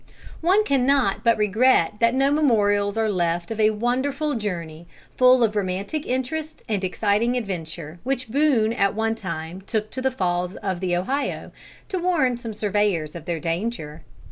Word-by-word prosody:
One 375 +6 +4
cannot 265 - +2
but 230 -1 +4
regret 210 -2 +3
that 230 +1 +3
no 270 +1 +3
memorials 205 -8 +2
are 225 0 +2
left 175 0 -1
of 225 - -4
a 215 0 +5
wonderful 260 +7 -1
journey, 170 - -5 0.3
full 255 -1 +5
of 215 -2 +1
romantic 200 +9 -2
interest 305 +5 -3
and 205 -3 -1
exciting 210 +6 +1
adventure, 170 -6 -5
which 260 0 -2
Boone 245 -4 +2
at 200 -2 +1
one 225 0 0
time 185 -4 -6
took 215 +2 -3
to 260 - -4
the 265 - +2
Falls 180 -6 -2
of 190 -3 -3
the 180 -1 0
Ohio, 270 +11 -2 0.4
to 375 - -2
warn 335 -9 +2
some 230 -3 -7
surveyors 205 -7 0
of 165 -2 -8
their 170 -2 -2
danger. 165 -2 -3
215 Hz, 165 wpm, -23 LUFS, 185-255 Hz, 0.4 s, a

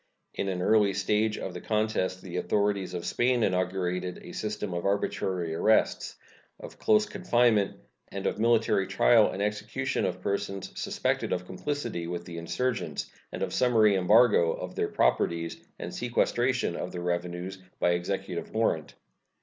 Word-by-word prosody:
In 100 - -2
an 90 -1 -2
early 105 -2 +4
stage 105 +2 +1
of 95 - -5
the 90 - -7
contest 105 -4 -1
the 90 -1 -5
authorities 100 -1 0
of 85 - -4
Spain 120 -1 +2
inaugurated 90 -1 -1
a - - -9
system 105 -2 -4
of 85 0 -3
arbitrary 95 -3 -1
arrests, 110 +7 +2 0.4
of - - -11
close 215 -1 +4
confinement, 120 - +2 0.3
and 100 - -5
of - - -1
military 110 -4 +3
trial 110 +3 +5
and 100 - -3
execution 105 0 -1
of - - -4
persons 100 -1 -3
suspected - - -1
of 90 0 -1
complicity 110 -4 -4
with 85 0 -4
the 85 -1 -6
insurgents, 125 +9 -2 0.2
and - - -3
of - - -3
summary 110 -4 +4
embargo 95 -2 +5
of - - -6
their - - 0
properties, 85 0 0
and - - -6
sequestration 120 -3 0
of - - -4
their 90 -1 -5
revenues 90 +2 -3 0.2
by 90 - +3
executive 90 0 -3
warrant. 85 -9 0
100 Hz, 150 wpm, -28 LUFS, 90-110 Hz, 0.4 s, trial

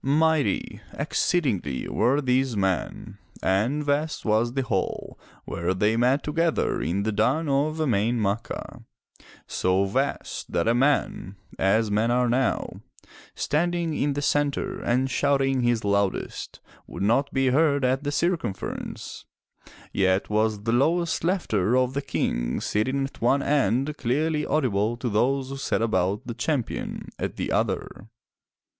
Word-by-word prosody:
Mighty, 150 -5 +1
exceedingly 100 - 0
were 130 +6 +2
these 130 -3 +1
men 95 -3 -2 0.2
and 115 +11 +1
vast 150 +2 -1
was 110 +2 +2
the 135 0 0
hall 95 -7 -3 0.3
where 85 +2 -2
they 105 +4 +2
met 125 +4 +2
together 165 +2 0
in 90 +6 -1
the 110 - 0
duni 155 +9 +1 0.2
of 155 +1 -5
E'main 120 -5 +1
Ma'cha, 105 +2 -3 0.6
so 95 +1 +1
vast 130 +8 -2
that 85 - 0
a 115 - +4
man, 125 -6 +1 0.2
as 105 +3 +2
men 110 +3 +2
are 125 +1 +2
now, 125 +1 0 0.5
standing 170 +1 0
in 145 -1 0
the 145 +1 -3
centre 145 +7 0
and 130 +3 0
shouting 135 -1 +2
his 120 -2 +1
loudest, 100 -1 -1 0.3
would - - -5
not 135 +7 +2
be 135 -1 +2
heard 140 0 +3
at 130 +2 +1
the 145 - -1
circumference, 150 - -3 0.7
yet 95 +1 +1
was 105 -1 +1
the 115 +1 0
lowest 165 +7 +1
laughter 125 - +1
of 130 0 +1
the 140 - -1
King - - -1
sitting 130 +6 0
at 135 - -7
one 135 +4 +3
end, 140 +1 +1
clearly 150 +5 0
audible 120 -6 +1
to 120 +1 -2
those 130 +5 +1
who 135 - -5
sat 135 - -1
about 100 -2 0
the 120 - -4
Champion 125 +1 -3
at - - -3
the - - -3
other. 110 - -2
125 Hz, 140 wpm, -25 LUFS, 105-145 Hz, 0.7 s, a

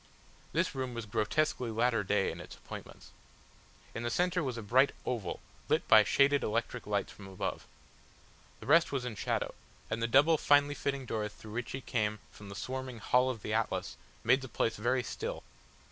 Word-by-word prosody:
This - - +1
room 130 -2 -3
was 115 -2 -4
grotesquely 120 +4 0
latter 115 0 +1
day 100 0 +1
in - - -8
its - - -10
appointments. - - -10 0.8
In 115 - -4
the 120 - -1
centre 180 +7 +1
was 130 -6 -3
a 115 - -5
bright 130 +7 +4
oval 110 -8 -3 0.3
lit - - +2
by 110 -1 +8
shaded 140 +5 +4
electric 115 +1 -2
lights 100 -1 -1
from 95 - -11
above. 95 -1 -4 0.9
The - - -9
rest 165 - +5
was 135 -3 -2
in 125 - -3
shadow, - - -1 0.4
and 110 +1 -1
the 115 - +2
double 145 +6 +5
finely 145 0 +4
fitting 140 -2 -2
doors 105 -3 -2
through 105 0 -12
which 120 0 -4
he 135 - -4
came 105 -5 -1
from 100 -1 -12
the 100 - -8
swarming 130 +2 -5
Hall 125 +3 +3
of 115 -5 -5
the 105 - -2
Atlas 110 0 -1 0.3
made 125 +4 +4
the 130 - -7
place 115 - 0
very 125 +4 +1
still. - - -5
120 Hz, 190 wpm, -32 LUFS, 110-130 Hz, 0.9 s, by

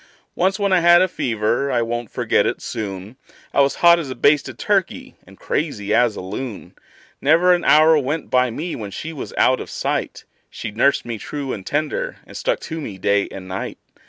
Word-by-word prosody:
Once 190 +2 +1
when 200 -2 +1
I 185 - +5
had 175 +1 +6
a - - +2
fever 120 - -1
I 120 -2 +1
won't 120 -1 -4
forget - - +1
it - - -2
soon 100 +1 -6 0.4
I - - +4
was 140 0 +2
hot 170 0 +8
as 150 -5 -5
a 130 - -5
basted 145 0 +2
turkey - - -1
and - - -16
crazy 105 -10 -2
as 120 -1 +3
a - - -6
loon; 105 +4 -6 0.5
Never 165 +5 +5
an 175 - 0
hour 155 +1 +6
went 145 +3 -3
by 125 0 +3
me 160 +9 -4
when 105 -3 -6
she 160 +11 -6
was 145 - -7
out - - +3
of - - -7
sight - - -3 0.2
She 110 - -6
nursed 125 +6 +2
me 115 -2 -5
true 140 +1 -5
and 95 - -6
tender, 155 - -2
and - - -14
stuck - - -1
to 160 -1 -6
me 105 -9 -7
day 100 +2 +1
and 95 -1 -9
night. 95 +1 -5
135 Hz, 205 wpm, -20 LUFS, 110-160 Hz, 0.5 s, hot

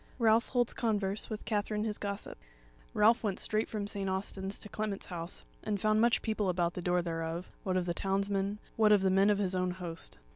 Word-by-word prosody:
CHAPTER - - -29
27 235 - 0
Ralph 225 +1 +5
Holds 245 -2 +1
Converse 205 -3 -1
With 215 -1 -5
Katherine 210 0 0
His 215 -2 -2
Gossip 200 0 -4 0.6
Ralph 220 +3 +5
went 200 -4 0
straight 215 +1 -1
from 210 -2 -3
St. 200 -1 -2
Austin's 190 +1 -2
to - - -8
Clement's 210 -1 -3
house, 170 0 -5 0.2
and 210 -2 -1
found 215 +2 +3
much 235 0 +3
people 215 -3 0
about 175 -1 +1
the 180 - -4
door 180 0 +1
thereof, 165 +1 -3
what 185 -1 0
of 180 - 0
the 175 - 0
townsmen, 195 +2 0 0.2
what 215 -1 +5
of 205 -2 +5
the 190 - +3
men 195 +2 +5
of 205 - +4
his 195 -2 0
own 185 0 +1
host. 175 -2 -5
200 Hz, 220 wpm, -32 LUFS, 185-215 Hz, 0.6 s, Ralph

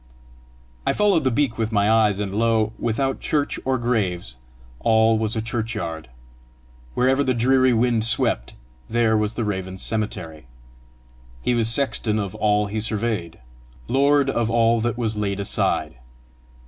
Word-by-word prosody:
I - - +1
followed 205 -7 +2
the - - +4
beak 130 -2 0
with 110 0 -1
my 100 -2 +2
eyes, 110 -2 +3
and 100 -1 -3
lo, 110 0 +1
without 135 +4 -1
church 145 -2 -1
or 130 0 0
graves, 100 - -1 0.4
all 110 0 +3
was 110 +1 -1
a 110 - -2
churchyard! 105 - -4 0.9
Wherever 130 +3 +2
the 130 -2 0
dreary 130 +2 +3
wind 115 -1 +2
swept, 110 - -1 0.3
there 115 -1 +2
was 105 +1 0
the 120 - -2
raven's 95 -2 -4
cemetery! 90 - -4 1.0
He 125 - +1
was 115 -2 +2
sexton 115 -4 0
of 100 -3 -3
all 105 -1 +1
he 105 +2 -3
surveyed! 105 - -2 0.5
lord 140 +1 +3
of 115 -3 0
all 115 0 +3
that 120 +1 -1
was 110 -3 -1
laid 100 -1 -2
aside! 100 -9 -1
110 Hz, 145 wpm, -22 LUFS, 105-120 Hz, 1.0 s, the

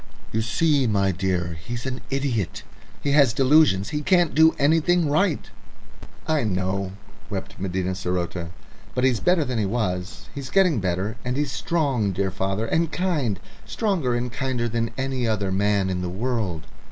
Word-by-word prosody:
"You 110 - 0
see, 135 +5 +2
my 100 -3 +2
dear, 90 -3 -2
he's 120 +3 -5
an 130 -1 -4
idiot. 135 -8 -1 0.4
He 145 - +1
has 140 -5 +5
delusions; 130 -7 +4
he 150 -1 -2
can't 175 -1 +3
do 160 +1 +5
anything 165 +3 +3
right." 155 +2 +1 0.8
"I 155 -3 +2
know," 95 -1 -1 0.4
wept 100 0 -6
Medina 95 -1 -1
saroté. 90 -2 -2 0.5
"But 125 - 0
he's 130 -4 +3
better 180 -4 +2
than 125 -3 -2
he 105 - +1
was. 95 -2 -2
He's 140 -2 -6
getting 180 - +3
better. 95 +4 -2
And 125 +1 -2
he's 145 -2 0
strong, 135 - 0
dear 95 +1 -1
father, 95 +4 -1
and 160 +6 +1
kind 150 - 0 0.2
stronger 180 - 0
and 120 0 -2
kinder 125 -1 -1
than 115 0 -1
any 130 -2 -1
I 110 - +3
other 100 -2 -2
man 100 0 +2
in 90 -1 -2
the 90 - -2
world. 100 -5 -2
115 Hz, 165 wpm, -24 LUFS, 95-145 Hz, 0.8 s, has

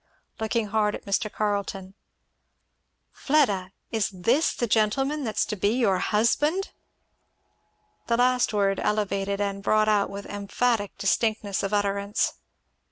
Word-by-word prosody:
Looking 220 -1 -1
hard 210 0 +1
at - - -10
Mr. 200 +1 -1
Carleton, 200 -2 -2 1.2
"Fleda! 205 -11 +1 0.2
Is 220 -3 0
this 230 - +1
the 240 - -1
gentleman 270 +7 +1
that's 220 -4 0
to 210 - -4
be 205 +3 +1
your 200 -7 +2
husband?" 295 - +1 1.4
The 235 - +2
last 250 0 +3
word 200 -2 +1
elevated 200 -1 -1
and 200 -1 -2
brought 215 +1 +2
out 210 -2 +2
with 200 0 -7
emphatic 205 +1 -1
distinctness 205 0 0
of 195 - -2
utterance. 200 0 0
210 Hz, 125 wpm, -26 LUFS, 200-230 Hz, 1.4 s, last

